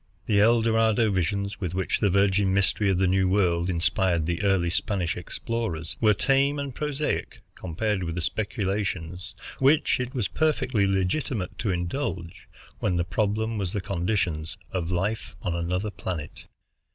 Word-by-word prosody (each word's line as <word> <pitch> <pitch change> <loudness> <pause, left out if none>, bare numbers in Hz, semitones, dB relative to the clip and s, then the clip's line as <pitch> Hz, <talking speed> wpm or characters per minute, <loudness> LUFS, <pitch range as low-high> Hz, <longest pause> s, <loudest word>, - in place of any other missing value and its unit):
The 105 -2 +3
El 115 +2 +5
Dorado 110 -1 +3
visions 100 +2 -1
with 90 -2 -2
which 95 -1 0
the 105 - +3
virgin 100 0 +3
mystery 100 +1 +2
of 95 - +2
the 95 - +3
New 95 +1 +3
World 90 -3 +2
inspired 85 -1 +1
the 85 +3 -1
early 95 -4 +2
Spanish 95 -2 0
explorers 90 -3 -4
were 105 -2 +5
tame 135 +4 +2
and 140 -2 -4
prosaic 150 +1 -2
compared 95 +4 -2
with 85 -2 -3
the 90 - -2
speculations 95 -4 -2 0.2
which 140 +2 +4
it 125 +2 -4
was 120 -6 0
perfectly 130 -9 +1
legitimate 95 +2 -1
to 110 - -1
indulge, 90 -1 -3 0.3
when 95 -4 0
the 85 - +1
problem 110 +4 0
was 95 -1 -2
the 105 - 0
conditions 90 -4 -1
of 90 -3 -2
life 95 +5 -2
on 90 -4 -1
another 90 +5 -1
planet. 80 -7 -6
100 Hz, 155 wpm, -26 LUFS, 90-110 Hz, 0.3 s, El